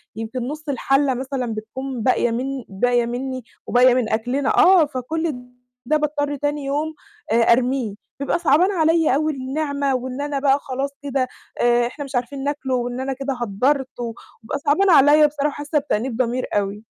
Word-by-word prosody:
يمكن 225 Hz, +3 st, -5 dB
نُص 305 Hz, +2 st, -6 dB
الحَلّة 275 Hz, +1 st, +2 dB
مثلًا 255 Hz, -2 st, -3 dB
بتكون 250 Hz, +3 st, -5 dB
باقية 240 Hz, -2 st, +2 dB
من 260 Hz, +2 st, -3 dB
باقية 240 Hz, +4 st, +1 dB
مِنّي 255 Hz, +1 st, -4 dB, 0.2 s
وباقية 250 Hz, 0 st, +5 dB
من 250 Hz, -3 st, 0 dB
أكلنا. 245 Hz, +5 st, 0 dB
آه. 365 Hz, -3 st, +7 dB
فكل 300 Hz, +4 st, -3 dB, 0.5 s
ده 305 Hz, +5 st, +2 dB
باضطر 290 Hz, -1 st, -1 dB
تاني 290 Hz, 0 st, -2 dB
يوم 300 Hz, +3 st, -1 dB, 0.4 s
آآ، -, -, +4 dB, 0.2 s
أرميه، 250 Hz, -3 st, 0 dB, 0.3 s
بيبقى 280 Hz, +5 st, 0 dB
صعبان 340 Hz, +4 st, +3 dB
عليّا 325 Hz, -3 st, +3 dB
أوي 310 Hz, +1 st, 0 dB
النعمة، 280 Hz, 0 st, -1 dB
وإن 255 Hz, +2 st, -4 dB
أنا 290 Hz, -1 st, -2 dB
بقى 275 Hz, 0 st, +3 dB
خلاص 270 Hz, +1 st, -3 dB
كده 270 Hz, -2 st, -1 dB, 0.3 s
آآ، 240 Hz, 0 st, +3 dB
إحنا 285 Hz, +3 st, -7 dB
مش 275 Hz, -1 st, -8 dB
عارفين 270 Hz, +3 st, -2 dB
ناكله، 280 Hz, -2 st, -1 dB
وإن 245 Hz, 0 st, -2 dB
أنا 270 Hz, +1 st, -2 dB
كده 275 Hz, +1 st, -3 dB
هدّرت، 255 Hz, +5 st, 0 dB
و -, -, -2 dB, 0.4 s
وبيبقى 225 Hz, -, -3 dB
صعبان 370 Hz, +7 st, +3 dB
عليّا 300 Hz, 0 st, +7 dB
بصراحة، 290 Hz, 0 st, -1 dB
حاسة 295 Hz, +1 st, -1 dB
بتأنيب 245 Hz, -3 st, -2 dB
ضمير 255 Hz, 0 st, 0 dB
أوي. 205 Hz, 0 st, -1 dB
270 Hz, 170 wpm, -21 LUFS, 245-290 Hz, 0.5 s, آه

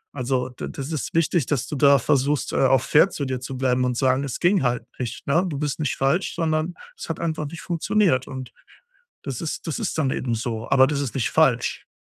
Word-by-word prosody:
also, 130 Hz, -1 st, -1 dB
d 125 Hz, -, -7 dB
das 140 Hz, +3 st, -6 dB
ist 155 Hz, 0 st, -4 dB
wichtig, 165 Hz, -3 st, +2 dB
dass 140 Hz, -5 st, 0 dB
du -, -, -4 dB
da 140 Hz, 0 st, +6 dB
versuchst, 140 Hz, +2 st, +1 dB
äh, -, -, 0 dB
auch 130 Hz, -1 st, +4 dB
fair 160 Hz, +6 st, +5 dB
zu 145 Hz, -, -4 dB
dir 130 Hz, -1 st, -2 dB
zu 130 Hz, +1 st, -6 dB
bleiben 130 Hz, -1 st, +1 dB
und 125 Hz, -1 st, 0 dB
sagen, 130 Hz, +1 st, +2 dB
es 140 Hz, -3 st, -4 dB
ging 180 Hz, +1 st, +3 dB
halt 120 Hz, -2 st, 0 dB, 0.2 s
nicht, 120 Hz, -1 st, -5 dB
ne? 160 Hz, +6 st, +2 dB
Du 145 Hz, -, -4 dB
bist 145 Hz, 0 st, -2 dB
nicht 150 Hz, -, -1 dB
falsch, 140 Hz, +8 st, 0 dB
sondern 160 Hz, +1 st, -1 dB, 0.2 s
es -, -, -9 dB
hat 165 Hz, -, -3 dB
einfach 160 Hz, -3 st, -2 dB
nicht 170 Hz, +3 st, -8 dB
funktioniert. 175 Hz, -, +1 dB
Und 130 Hz, -2 st, -7 dB, 0.7 s
das 135 Hz, -4 st, -5 dB
ist 160 Hz, -, -4 dB
das 160 Hz, -, -2 dB
ist -, -, -2 dB
dann 150 Hz, -4 st, +1 dB
eben 125 Hz, -2 st, -1 dB
so. 115 Hz, 0 st, -4 dB
Aber 135 Hz, -1 st, +6 dB
das 140 Hz, 0 st, -1 dB
ist 140 Hz, -5 st, -3 dB
nicht 130 Hz, -4 st, 0 dB
falsch. 130 Hz, -7 st, +2 dB
140 Hz, 230 wpm, -23 LUFS, 130-155 Hz, 0.7 s, da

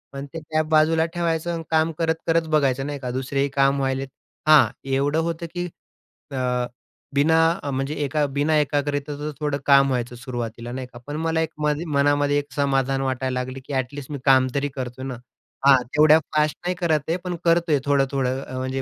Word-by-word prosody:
आणि 140 Hz, +1 st, -5 dB
ते 165 Hz, -, -4 dB
टॅब 155 Hz, 0 st, -1 dB
बाजूला 160 Hz, +1 st, +4 dB
ठेवायचं 170 Hz, -1 st, -1 dB
आणि 165 Hz, -1 st, -4 dB
काम 160 Hz, 0 st, +3 dB
करत 160 Hz, -1 st, +1 dB
करत 165 Hz, 0 st, +2 dB
बघायचं 135 Hz, -4 st, +2 dB
नाही 145 Hz, -1 st, -4 dB
का, 130 Hz, -2 st, -5 dB
दुसरेही 135 Hz, +2 st, -1 dB
काम 140 Hz, 0 st, +3 dB
व्हायलेत. 135 Hz, 0 st, -1 dB, 0.4 s
हां, 150 Hz, -6 st, +7 dB, 0.2 s
एवढं 140 Hz, +3 st, +1 dB
होतं 165 Hz, 0 st, -2 dB
की 175 Hz, 0 st, -2 dB, 0.7 s
अ, 135 Hz, -, -4 dB, 0.8 s
बिना 150 Hz, +3 st, +3 dB, 0.3 s
अ, 145 Hz, -, -3 dB
म्हणजे 135 Hz, +2 st, -2 dB
एका 145 Hz, +1 st, +1 dB
बिना 150 Hz, +2 st, +2 dB
एकाग्रतेचं 145 Hz, 0 st, -2 dB
थोडं 150 Hz, -2 st, -1 dB
काम 140 Hz, -1 st, +6 dB
व्हायचं 125 Hz, -2 st, -2 dB
सुरुवातीला 120 Hz, -2 st, -6 dB
नाही 130 Hz, 0 st, -5 dB
का. 120 Hz, -, -14 dB
पण 145 Hz, -, -4 dB
मला 160 Hz, 0 st, +1 dB
एक 160 Hz, -, -1 dB
माझ्या 150 Hz, +3 st, 0 dB
मनामध्ये 145 Hz, 0 st, +3 dB
एक 145 Hz, 0 st, -8 dB
समाधान 135 Hz, -1 st, +1 dB
वाटायला 130 Hz, -1 st, -1 dB
लागली 130 Hz, +1 st, -5 dB
की 145 Hz, -, -7 dB
एटलीस्ट 135 Hz, +2 st, -6 dB
मी 145 Hz, -, -3 dB
काम 130 Hz, -1 st, +5 dB
तरी 140 Hz, 0 st, +1 dB
करतोय 130 Hz, 0 st, -5 dB
ना. 130 Hz, -2 st, -4 dB, 0.5 s
हां, 135 Hz, -2 st, +7 dB
तेवढ्या 155 Hz, +1 st, +7 dB, 0.2 s
फास्ट 150 Hz, 0 st, +2 dB
नाही 180 Hz, +1 st, 0 dB
करत 165 Hz, -3 st, +1 dB
आहे 165 Hz, -, +2 dB
पण 180 Hz, -1 st, -3 dB
करतोय 170 Hz, -3 st, +3 dB
थोडं-थोडं. 135 Hz, -2 st, +1 dB
अ, 130 Hz, -, -7 dB
म्हणजे 130 Hz, +1 st, -2 dB
145 Hz, 190 wpm, -23 LUFS, 135-155 Hz, 0.8 s, हां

